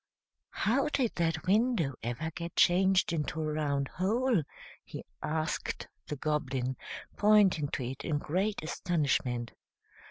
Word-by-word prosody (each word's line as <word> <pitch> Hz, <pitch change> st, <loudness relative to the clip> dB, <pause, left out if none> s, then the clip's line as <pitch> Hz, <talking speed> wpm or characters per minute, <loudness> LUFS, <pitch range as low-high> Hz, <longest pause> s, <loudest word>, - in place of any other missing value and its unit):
"How 265 Hz, +6 st, +2 dB
did 260 Hz, -6 st, 0 dB
that 165 Hz, 0 st, 0 dB
window 205 Hz, -, +2 dB
ever 120 Hz, +8 st, -3 dB
get 170 Hz, +1 st, -6 dB
changed 190 Hz, 0 st, +4 dB
into 155 Hz, 0 st, -2 dB
a 155 Hz, -1 st, -1 dB
round 140 Hz, -2 st, 0 dB
hole?" 220 Hz, -, +1 dB, 0.4 s
he -, -, -8 dB, 0.2 s
asked 155 Hz, +1 st, -2 dB, 0.2 s
the 150 Hz, -, -3 dB
Goblin, 135 Hz, -3 st, -1 dB, 0.4 s
pointing 205 Hz, -8 st, +5 dB
to 135 Hz, -, -3 dB
it 130 Hz, +2 st, -5 dB
in 150 Hz, -, 0 dB
great 185 Hz, +7 st, -1 dB
astonishment. 140 Hz, -8 st, 0 dB
160 Hz, 125 wpm, -31 LUFS, 145-195 Hz, 0.4 s, pointing